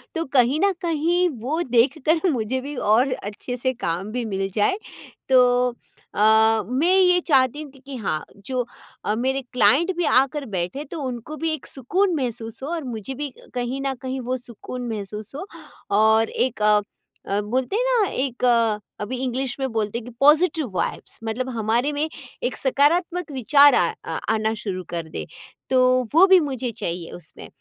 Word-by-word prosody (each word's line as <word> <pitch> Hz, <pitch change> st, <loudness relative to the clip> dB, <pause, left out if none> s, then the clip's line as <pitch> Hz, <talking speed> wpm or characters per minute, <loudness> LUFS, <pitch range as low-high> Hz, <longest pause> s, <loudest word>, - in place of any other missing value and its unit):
तो 330 Hz, -, 0 dB
कहीं 260 Hz, +3 st, +4 dB
न 400 Hz, -, +3 dB
कहीं 345 Hz, +1 st, +1 dB
वो 300 Hz, +8 st, -1 dB
देखकर 290 Hz, +8 st, +2 dB
मुझे 255 Hz, 0 st, -1 dB
भी 285 Hz, +3 st, -6 dB
और 245 Hz, +3 st, +3 dB
अच्छे 215 Hz, +2 st, -6 dB
से 260 Hz, +1 st, 0 dB
काम 195 Hz, -4 st, -3 dB
भी 245 Hz, +1 st, -2 dB
मिल 195 Hz, -2 st, -2 dB
जाए। 220 Hz, -, +2 dB, 0.5 s
तो 260 Hz, -1 st, +6 dB, 0.8 s
अ, -, -, 0 dB, 0.5 s
मैं 300 Hz, +9 st, +2 dB
ये 360 Hz, -1 st, +5 dB
चाहती 270 Hz, -1 st, +3 dB
हूँ, 295 Hz, -3 st, -9 dB
कि 270 Hz, -, -18 dB
कि 275 Hz, -1 st, -7 dB
हाँ, 175 Hz, -8 st, -2 dB, 0.2 s
जो 255 Hz, -2 st, -1 dB, 0.4 s
अ, 210 Hz, -, +1 dB
मेरे 265 Hz, +4 st, 0 dB
क्लाइंट 320 Hz, +9 st, +4 dB
भी 350 Hz, -, +1 dB
आकर 275 Hz, +1 st, +2 dB
बैठें 195 Hz, +6 st, -3 dB
तो 315 Hz, +2 st, -7 dB
उनको 255 Hz, +3 st, -5 dB
भी 320 Hz, +2 st, -1 dB
एक 310 Hz, -, -6 dB
सुकून 355 Hz, -, 0 dB
महसूस 230 Hz, -5 st, -4 dB
हो 280 Hz, -, -4 dB
और 335 Hz, -2 st, -3 dB
मुझे 240 Hz, 0 st, -5 dB
भी 285 Hz, -1 st, -5 dB, 0.2 s
कहीं 250 Hz, +2 st, -2 dB
न 270 Hz, -, 0 dB
कहीं 260 Hz, 0 st, -4 dB
वो 255 Hz, +1 st, -2 dB
सुकून 245 Hz, +1 st, -8 dB
महसूस 210 Hz, -1 st, -6 dB
हो। 310 Hz, -, -5 dB, 0.5 s
और 220 Hz, +1 st, +4 dB
एक 250 Hz, -4 st, -1 dB
अ 210 Hz, 0 st, +4 dB, 0.5 s
अ, 200 Hz, +1 st, 0 dB
बोलते 250 Hz, -, -2 dB
हैं 475 Hz, -, +2 dB
ना 485 Hz, -5 st, +3 dB
एक 255 Hz, -2 st, -3 dB, 0.6 s
अभी 215 Hz, +5 st, -4 dB
इंग्लिश 255 Hz, 0 st, -2 dB
में 265 Hz, -, 0 dB
बोलते 220 Hz, 0 st, -1 dB
हैं 235 Hz, -, -6 dB
कि 245 Hz, -, -9 dB
पॉजिटिव 300 Hz, 0 st, +4 dB
वाइब्स, -, -, -3 dB
मतलब 235 Hz, +4 st, -3 dB
हमारे 235 Hz, +3 st, 0 dB
में 300 Hz, +2 st, -1 dB, 0.3 s
एक 245 Hz, -, -1 dB
सकारात्मक 330 Hz, +5 st, +1 dB
विचार 280 Hz, +2 st, +5 dB
आ -, -, +2 dB, 0.4 s
आना 220 Hz, 0 st, 0 dB
शुरू 185 Hz, -3 st, -4 dB
कर 170 Hz, -2 st, -4 dB
दे, -, -, -5 dB, 0.4 s
तो 255 Hz, -1 st, +4 dB
वो 340 Hz, +5 st, +8 dB
भी 380 Hz, -1 st, +7 dB
मुझे 265 Hz, -5 st, -3 dB
चाहिए 175 Hz, -6 st, -5 dB
उसमें। 170 Hz, -4 st, -10 dB
255 Hz, 175 wpm, -23 LUFS, 225-295 Hz, 0.8 s, वो